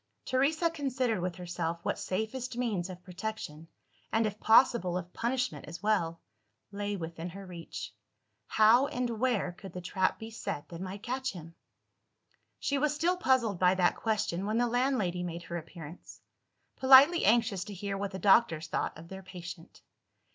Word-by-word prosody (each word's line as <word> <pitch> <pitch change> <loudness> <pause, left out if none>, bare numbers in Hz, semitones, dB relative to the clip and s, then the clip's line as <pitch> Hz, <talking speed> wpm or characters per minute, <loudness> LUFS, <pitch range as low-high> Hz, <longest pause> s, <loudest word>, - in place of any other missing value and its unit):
Teresa 310 +6 +2
considered 260 - -1
with 180 -1 -2
herself 170 -2 -3
what - - -1
safest 235 +6 -3
means 205 -8 -1
of 180 -1 -9
protection 180 -4 -6 0.4
and, 225 0 +2
if 210 0 -3
possible, 220 -6 +4
of 180 0 -7
punishment 240 - -1
as 165 +6 -9
well 170 -6 +1 0.5
lay 205 0 -3
within 165 0 -6
her 195 +3 -9
reach. 175 -2 -7 0.5
How, 225 +5 +5
and 250 -2 -2
where, 235 -8 +1
could 190 0 -11
the 180 - -5
trap 185 +1 0
be 220 +1 -8
set 185 -9 -5
that 170 0 -8
might 190 +2 -6
catch 260 +1 -2
him? 165 -2 -10 1.0
She 280 -1 0
was 300 +1 +1
still 345 +4 +2
puzzled 255 - +2
by 180 0 +4
that 180 -1 +3
question, 205 -4 -1
when 215 +2 0
the 245 - +3
landlady 240 -7 0
made 170 -1 -5
her 170 - -5
appearance 165 0 -10 0.6
politely 275 +6 +7
anxious 215 -4 +3
to 210 - -7
hear 200 +2 -3
what 200 0 -2
the 190 - -6
doctors 190 -4 +4
thought 155 - -2
of 165 +1 -11
their 190 +2 -8
patient. 180 -2 -10
200 Hz, 165 wpm, -30 LUFS, 175-245 Hz, 1.0 s, politely